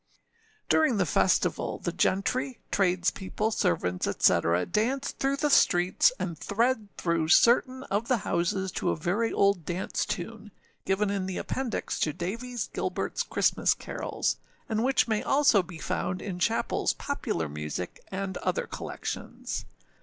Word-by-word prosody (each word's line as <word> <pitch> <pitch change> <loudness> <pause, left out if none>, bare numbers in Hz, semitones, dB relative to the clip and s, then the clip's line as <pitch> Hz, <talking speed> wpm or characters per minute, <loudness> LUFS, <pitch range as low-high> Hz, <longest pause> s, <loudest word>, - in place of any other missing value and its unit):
ââ 445 -2 -37
During 310 -8 +3
the 190 - +2
festival, 150 - +1
the - - -3
gentry, 250 +7 0
tradespeople, 190 +3 0
servants, 90 - 0
&c., 85 - +5 0.3
dance 260 +6 0
through 275 +1 0
the 295 0 +1
streets, 180 - +4
and 170 - -3
thread 225 +1 0
through 170 -2 0
certain 255 - +4
of 215 -1 -2
the 255 - +3
houses 190 +2 0
to - - -1
a - - +1
very 185 +8 0
old 200 -3 +2
dance 175 +3 -2
tune, 210 +4 -5 0.4
given 200 +1 +1
in 195 -2 -2
the 190 - -3
appendix 260 -3 -3
to 155 - +1
Davies 230 +9 -4
Gilbertâs - - -2
Christmas - - +2
Carols, - - -2 0.3
and 220 0 0
which 265 0 +3
may 220 -2 +1
also 275 -7 +4
be 175 -2 -10
found 180 +3 -2
in 185 -3 -5
Chappellâs 225 +5 +1
Popular 280 - -2
Music, 75 +4 -5
and 190 -1 -3
other - - -1
collections. - - -5
200 Hz, 145 wpm, -28 LUFS, 180-250 Hz, 0.4 s, c